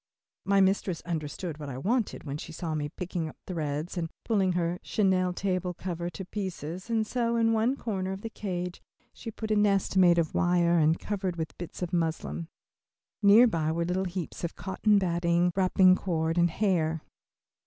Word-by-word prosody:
My 195 0 +4
mistress 190 -2 +1
understood 160 0 -4
what 145 -2 -6
I 125 - -5
wanted 220 - -1
when 145 -1 -4
she 155 - -8
saw 160 0 -4
me 150 -1 -2
picking 175 0 -4
up - - -14
threads 155 0 -3
and 165 -1 -3 0.2
pulling 195 -5 +2
her 175 0 -1
chenille 185 -3 +1
table 180 -1 -2
cover 175 -1 -4
to 185 +2 -7
pieces, 185 -1 -5
and 225 -1 +1
so 235 0 0
in 225 -1 +3
one 225 +4 +2
corner 190 -7 -3
of 190 +1 -5
the 225 - -5
cage 180 -4 -4 0.3
she 230 - -8
put 220 0 -5
a - - +4
nest 200 -2 +2
made 175 -2 +6
of 165 -2 +1
wire 175 -1 +3
and 160 +1 +3
covered 190 -4 -3
with 160 -2 -3
a - - -32
bit 175 - -7
of 175 - -4
muslin. 85 - -1 0.7
Near 210 +4 +8
by 165 -9 +1
were 170 +1 -1
little 185 +2 0
heaps 180 -1 -5
of 170 - -3
cotton 205 +3 +1
batting, 175 -1 +2
wrapping 185 -1 +5
cord, 165 -2 -1
and 175 0 +4
hair. 165 -4 0
180 Hz, 185 wpm, -28 LUFS, 165-195 Hz, 0.7 s, Near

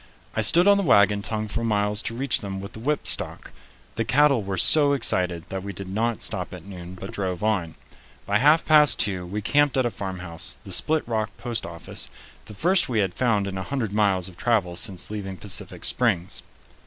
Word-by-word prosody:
I 110 - +1
stood 170 - +6
on 200 0 +6
the 200 - 0
wagon 105 - +4
tongue 110 0 -3
for 115 +3 -3
miles 105 -1 +1
to 115 - -4
reach 135 0 0
them 95 -1 -5
with 100 +3 -8
the - - -9
whipstock. 145 +6 +1 0.5
The 115 - +1
cattle 140 0 +3
were 95 -1 -4
so 145 - +4
excited 90 -10 0
that 95 0 -4
we 100 +1 -6
did 100 -1 -7
not 110 +4 -2
stop 90 -4 -2
at 90 - -12
noon, 90 -2 -9
but 95 +2 -8
drove 95 -1 -4
on. 95 -7 -1 0.5
By 100 +1 +1
half 150 +5 +4
past 150 -2 +5
two 95 -4 -1
we 105 +3 -4
camped 145 +1 +2
at 130 - +2
a 120 - 0
farmhouse, 90 -5 -5
the - - -10
Split 155 -3 +1
Rock 110 -2 -1
post 120 -2 -3
office, 85 -1 -6 0.4
the 105 - -11
first 180 - +2
we 120 - -1
had 95 -4 +1
found 110 -4 +1
in 95 -1 -4
a - - -4
hundred 115 -4 -3
miles 100 -4 +1
of 90 -2 -13
travel 105 -8 0
since 95 -1 -3
leaving 95 -3 -5
Pacific 100 -1 -2
Springs. 100 -8 0
105 Hz, 205 wpm, -24 LUFS, 95-120 Hz, 0.5 s, stood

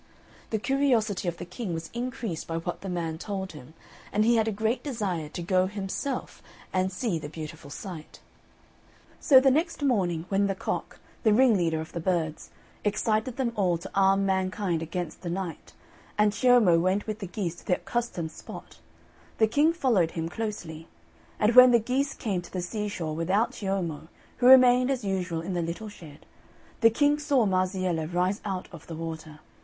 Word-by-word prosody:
The 220 - 0
curiosity 230 -6 +1
of 170 -1 -2
the - - -6
King 180 0 -5
was 165 0 -6
increased 235 -7 -4
by 165 - -2
what 175 +1 -4
the 195 - -5
man 165 -3 -3
told 190 -1 -4
him, 150 0 -13 0.4
and 210 +1 +2
he 235 +1 +4
had 220 0 +2
a - - +1
great 220 +4 -1
desire 195 - -3
to 175 - -6
go 185 +1 +2
himself 205 +7 -4 0.3
and 185 0 +1
see 185 -3 -2
the 145 -1 -7
beautiful 155 -1 -8
sight. 165 0 -8 1.0
So 270 -4 +7
the 265 0 +4
next 315 +2 0
morning, 180 - +1
when 200 0 +2
the 195 - -1
Cock, - - -4 0.2
the 220 - +4
ringleader 195 -11 +3
of 160 - -7
the 170 - -4
birds, 165 -3 -1 0.3
excited 215 +3 0
them 250 -3 -1
all 185 -5 +2
to 175 +4 -10
arm 195 0 +3
mankind 190 -2 0
against 165 0 -5
the 175 - -4
Night, 180 -1 -5 0.4
and 210 0 +4
Ciommo 215 -6 +5
went 185 +3 +1
with 215 0 -4
the 195 - -5
geese 175 -3 -4
to - - -15
the 180 - +3
accustomed 205 -10 -3
spot, - - -11 0.6
the 220 - +5
King 290 +9 +3
followed 245 - +2
him 165 0 -2
closely; 175 -7 -5 0.5
and 215 +2 +3
when 250 +1 +10
the 240 -1 +5
geese 260 +5 -1
came 195 -5 -2
to 175 - -14
the 180 -2 -3
seashore, 185 -5 -3
without 185 +8 +1
Ciommo, 185 -6 -3 0.3
who 245 - +3
remained 255 -1 +7
as 260 -4 -1
usual 180 -4 -2
in 185 +3 -4
the 175 - 0
little 170 +6 -4
shed, 160 -8 -13 0.5
the 230 - +7
King 290 +5 +2
saw 285 -5 +2
Marziella 185 -4 0
rise 180 +3 0
out 190 -3 -4
of 170 -3 -12
the 165 - -6
water. 160 -1 -7
195 Hz, 180 wpm, -27 LUFS, 170-225 Hz, 1.0 s, when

